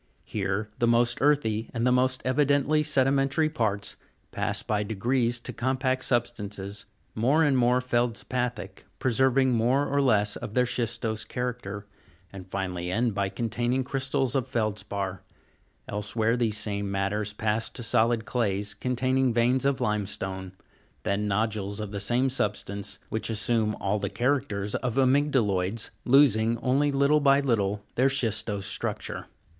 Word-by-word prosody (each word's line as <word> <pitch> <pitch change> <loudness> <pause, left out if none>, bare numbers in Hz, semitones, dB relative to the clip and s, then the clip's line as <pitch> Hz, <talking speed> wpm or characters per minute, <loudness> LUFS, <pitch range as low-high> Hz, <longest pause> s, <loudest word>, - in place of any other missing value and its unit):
Here 100 +3 -2
the 120 - +3
most 120 +2 +3
earthy, 115 -7 +2
and 115 +1 0
the 125 - +4
most 130 +1 +2
evidently 145 +3 +2
sedimentary 140 +1 +2
parts, 105 -8 -1 0.3
pass - - -1
by 105 -1 0
degrees 120 +4 0
to - - -5
compact 130 +1 0
substances, 105 -5 -2 0.3
more 135 +9 +3
and 145 -3 +3
more 125 0 +3
fcldspathic, 120 -4 -2
preserv 130 +1 +2
ing 130 -1 +3
more 125 +4 +2
or 140 0 +1
less 105 -6 +3
of 105 - -7
their 125 0 +4
schistose 115 -2 -2
character, 120 -5 -4 0.5
and 95 -1 -10
finally 90 -2 -3
end 115 +4 0
by 100 -1 -1
containing 120 +4 -1
crystals 135 -1 -1
of 135 -4 0
feldspar; 100 -4 -3 0.7
elsewhere 105 +3 0
these 115 -3 +1
same 100 -2 -1
matters 100 +2 -1
pass 110 +1 -1
to 120 - -6
solid 115 0 +2
clays, 105 -4 -1
con 125 0 -3
taining 130 +1 +2
veins 120 +3 +2
of 140 -1 +1
limestone, 95 -4 -2 0.5
then 100 +1 0
nodules 105 0 -1
of 105 -2 -5
the 100 - -4
same 120 +6 +2
substance, 105 -5 -1
which 110 - -2
as 110 -2 -1
sume 110 -2 +1
all 100 +2 0
the 100 -1 -2
characters 120 -6 -1
of 125 -3 -2
amygdaloids, 125 -7 +1
losing, 115 -4 +4
only 135 +4 +1
little 140 +2 +3
by 140 -1 +4
little, 105 -7 0
their 130 +2 +3
schistose 110 -6 -1
structure. - - -4
115 Hz, 145 wpm, -27 LUFS, 105-130 Hz, 0.7 s, the